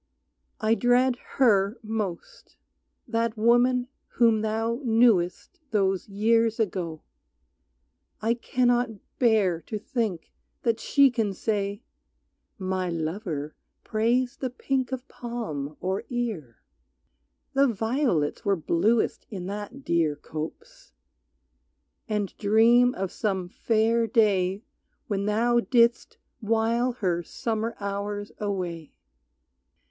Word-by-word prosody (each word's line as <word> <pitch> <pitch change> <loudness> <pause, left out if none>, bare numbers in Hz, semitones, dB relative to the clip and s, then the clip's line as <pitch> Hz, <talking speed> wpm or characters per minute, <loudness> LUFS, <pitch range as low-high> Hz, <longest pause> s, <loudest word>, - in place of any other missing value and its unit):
I 215 +1 +2
dread 245 +2 +3 0.2
her 210 -4 +4
most, 215 -5 -5 0.5
that 230 -1 -1
woman 245 +3 +3 0.3
whom 230 -3 +4
thou 225 +3 -1
knewest 225 -7 +2
Those 195 -3 0
years 225 +2 +2
ago, 175 -7 -2 1.2
I 225 +2 +1
cannot 245 0 +1 0.3
bear 210 -8 +3
to 215 - -5
think 210 -5 -3 0.3
That 230 -1 +1
she 280 +1 +4
can 225 -5 -1
say: 205 +1 -2 0.7
"My 185 -1 -2
lover 160 -2 -3 0.3
praised 245 +4 0
the 260 - -1
pink 260 +1 -2
Of 260 +1 -5
palm, 155 - -5
or 190 +2 -2
ear," 215 - -4 0.9
"The 275 +1 +4
violets 225 - 0
were 200 -1 +2
bluest 200 +7 +1
In 190 -5 -6
that 210 +7 -6
dear 165 -3 +1
copse," 460 - -8 1.2
and 210 -2 -2
dream 230 +4 +5
of 190 -1 -3
some 190 -7 -2
fair 225 +3 +1
day 200 -3 +2 0.4
When 200 -1 -2
thou 235 +3 +3
didst 235 -1 +2 0.2
while 230 +2 +1
her 180 -7 -1
summer 225 +5 -3
hours 205 0 -4
away. 180 -6 -4
220 Hz, 105 wpm, -26 LUFS, 190-240 Hz, 1.2 s, dream